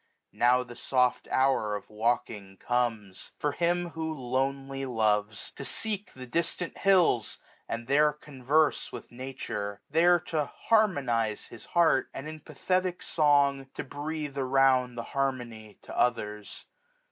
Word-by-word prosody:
Now 125 +1 +3
the 120 -1 -11
soft 125 0 +1
hour 130 -6 +2
Of 105 - -7
walking 105 -3 -2
comes: 115 -6 -2
for 150 - 0
him 175 +2 0
who 160 0 -3
lonely 135 0 -2
loves. 105 -4 0
To - - -8
seek 210 +6 -3
the 130 -1 -9
distant 165 +6 -2
hills, 180 - +3 0.3
and 115 +1 -3
there 150 +4 +4
converse 150 +1 0
1^80 - - -15
With - - -9
Nature; 115 -5 -5
there 175 +3 +5
to 155 -3 -1
harmonize 135 - +1
his - - -11
heart. 165 -6 +4
And 135 - -6
in 155 0 -7
pathetic 180 +5 -2
song 140 -3 +3
to - - -4
breathe 145 0 -5
around 130 -2 +3
The 115 - -4
harmony 120 -6 -3
to - - -9
others. 105 -4 -1
135 Hz, 135 wpm, -28 LUFS, 120-155 Hz, 0.3 s, there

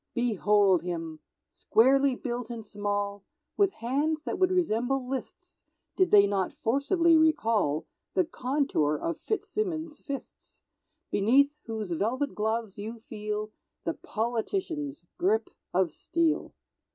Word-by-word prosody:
Behold 210 -6 +3
him! 165 -2 -4 0.3
Squarely 270 +3 +3
built 245 -2 -4
and 230 -2 -6
small; 205 -1 -2 0.3
With 400 -2 +3
hands 300 +5 0
that - - -3
would 370 -1 +4
resemble 270 -7 +1
Liszt's, 265 0 -7 0.3
Did 375 -1 +3
they 205 -1 +7
not 195 -2 -1
forcibly 325 - +3
recall 225 - +2 0.3
The 370 - +3
contour 260 - 0
of 165 +3 -3
Fitzsimmons' 330 -8 -3
fists; 280 -2 -8 0.5
Beneath 260 +8 +4 0.2
whose 220 -4 -4
velvet 245 - 0
gloves 220 -1 -2
you 220 +3 -5
feel 215 -1 -5 0.3
The - - -1
politician's 285 - -3
grip 405 +5 +1 0.2
of 180 -2 +2
steel. 330 - -1
240 Hz, 115 wpm, -28 LUFS, 205-300 Hz, 0.5 s, they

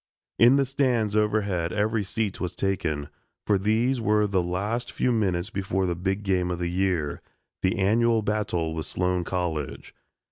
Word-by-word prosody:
In 120 +3 +7
the 140 -1 +3
stands 125 -6 +1
overhead 100 -5 +1
every 110 +1 0
seat 100 +1 -3
was 90 - -3
taken, 85 -7 -1 0.4
for 100 -2 +2
these 115 +5 +1
were 105 -1 +3
the 95 -3 +1
last 100 +7 -2
few 125 - 0
minutes 95 -6 0
before 95 -1 -1
the 90 - 0
big 95 +4 -2
game 90 -2 +1
of 90 - -2
the 85 0 -2
year 90 -5 0 0.4
the 95 - +1
annual 110 +3 +3
battle 100 -6 -1
with 80 -1 -4
Sloan 90 -1 0
College. 85 -5 -3
95 Hz, 165 wpm, -26 LUFS, 90-110 Hz, 0.4 s, In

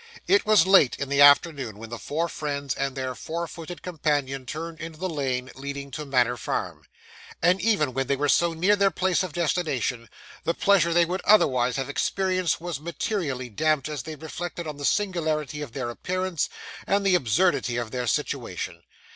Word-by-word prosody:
It 390 0 +3
was 215 -3 +6
late 190 -9 +5
in 140 - -4
the 140 0 +3
afternoon 140 - +5
when 115 +1 -10
the 115 - -5
four 165 +4 -2
friends 140 -4 -3
and 135 -1 -2
their 130 -1 -3
four 165 +6 -4
footed 170 +1 -9
companion 145 -6 -1
turned 160 +4 -6
into 160 -1 -7
the 185 - -2
lane 130 -6 -2
leading 140 0 -6
to 150 +3 -6
Manor 125 -2 +2
Farm; - - -4 0.5
and 180 +3 +3
even 190 - +2
when 135 0 -1
they 140 - +2
were 145 +2 0
so 170 +3 +3
near 185 +6 +3
their 200 -1 +3
place 185 -2 +1
of 185 -3 -3
destination, 145 -9 -1 0.3
the 165 - 0
pleasure 190 -4 +3
they 170 0 +4
would 180 +3 -3
otherwise 130 - +4
have 135 -1 -2
experienced 185 +3 0
was 170 -4 -4
materially 155 - -3
damped 155 +5 +1
as 150 -3 -4
they 155 +3 -7
reflected 170 +3 -6
on 150 -2 -6
the 145 - -4
singularity 155 -7 0
of 140 -6 -7
their 120 - -3
appearance, 185 +4 -2 0.4
and 200 0 +1
the 195 - +4
absurdity 130 - +2
of 120 -2 -3
their 125 -1 -3
situation. - - -3
155 Hz, 185 wpm, -25 LUFS, 135-175 Hz, 0.5 s, was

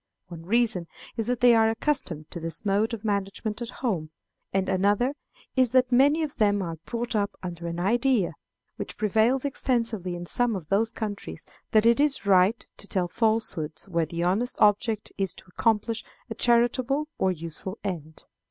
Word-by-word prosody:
One 165 -1 -10
reason 215 -6 +1 0.3
is 225 -2 -2
that 245 -1 -1
they 245 -1 +7
are 225 -1 +5
accustomed 225 - -1
to 170 - -5
this 165 +4 -5
mode 205 +3 +2
of 230 -2 -6
management 205 +2 -2
at 235 - -4
home; 195 -12 -2 0.4
and 190 0 0
another 205 +7 +2 0.4
is 255 -2 +3
that 255 0 +4
many 285 +6 +4
of 300 - -5
them 205 -1 +3
are 165 -2 -5
brought 235 0 -3
up 200 -1 -1
under 170 -1 -5
an 170 0 -4
idea, 235 +1 +2 0.4
which - - -6
prevails 220 +6 +2
extensively 230 -9 -1
in 175 0 -6
some 240 +4 +2
of 170 -6 -7
those 220 +3 +3
countries, 205 -2 -6 0.2
that 215 0 +4
it 235 +3 +5
is 290 -5 +2
right 195 +3 +4
to 200 - -9
tell 185 -3 0
falsehoods 215 -8 -1
where 170 -4 0
the 170 +2 -3
honest 205 +8 0
object 210 +1 +2
is 195 -2 0
to - - -11
accomplish 225 +3 0 0.3
a - - 0
charitable 245 +5 +2
or 190 - +3
useful 170 +4 -6
end. 160 -6 -6
210 Hz, 175 wpm, -26 LUFS, 185-240 Hz, 0.4 s, they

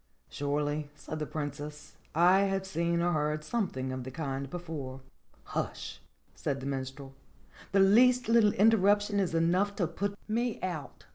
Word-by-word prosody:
"Surely," 145 +1 -1
said 155 +1 -6
the 150 - -3
Princess, 150 0 -6 0.2
"I 180 +4 +6
have 195 -1 -1
seen 170 -2 0
or 155 -4 +1
read 150 0 -3
something 155 - -2
of 130 -1 -4
the 130 - -6
kind 135 -1 -4
before." 145 -6 -6 0.4
"Hush - - -4 0.2
!" - - -38
said 140 -1 -2
the 135 - -7
Minstrel. 135 0 -5 0.6
"The 195 0 +4
least 245 +5 +5
little 225 -2 +5
inter 225 +3 +5
ruption 205 +1 +3
is 180 -4 0
enough 180 +5 +2
to 180 - +1
put 200 +5 -3
me 235 +1 -1
out. 155 -8 -5
165 Hz, 160 wpm, -30 LUFS, 145-200 Hz, 0.6 s, I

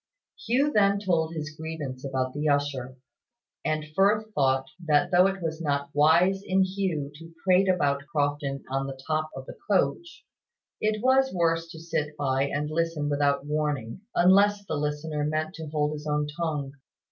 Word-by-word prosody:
Hugh 270 +6 +2
then 200 -3 +3
told 170 -5 0
his 155 -1 -4
grievance 155 -5 -6
about 130 -2 -2
the 150 +1 -1
usher, 140 -3 -1 0.7
and 155 0 -1
Firth 210 +2 +2
thought 135 -3 +2 0.2
that 155 +2 +2
though 180 +1 +6
it 195 -2 -3
was 160 0 -3
not 140 -2 -1
wise 170 +6 +4
in 190 0 +2
Hugh 185 -7 -2
to 165 +3 -12
prate 190 0 +4
about 145 -6 +1
Crofton 145 -2 -1
on 135 0 -1
the 135 -1 -7
top 155 0 -1
of 135 0 -7
the - - -11
coach, 205 - 0 0.5
it 215 +1 0
was 265 +1 +4
worse 165 -2 +1
to 160 - -10
sit 150 -2 -3
by 135 -1 +1
and 150 +2 -2
listen 165 -2 -1
without 145 -1 +1
warning, 150 -3 -2
unless 200 +3 +4
the 160 - -4
listener 150 0 -2
meant 155 +2 -1
to 160 -3 -7
hold 150 0 0
his 150 0 -7
own 150 0 +1
tongue. 150 -5 -2
155 Hz, 170 wpm, -27 LUFS, 145-180 Hz, 0.7 s, though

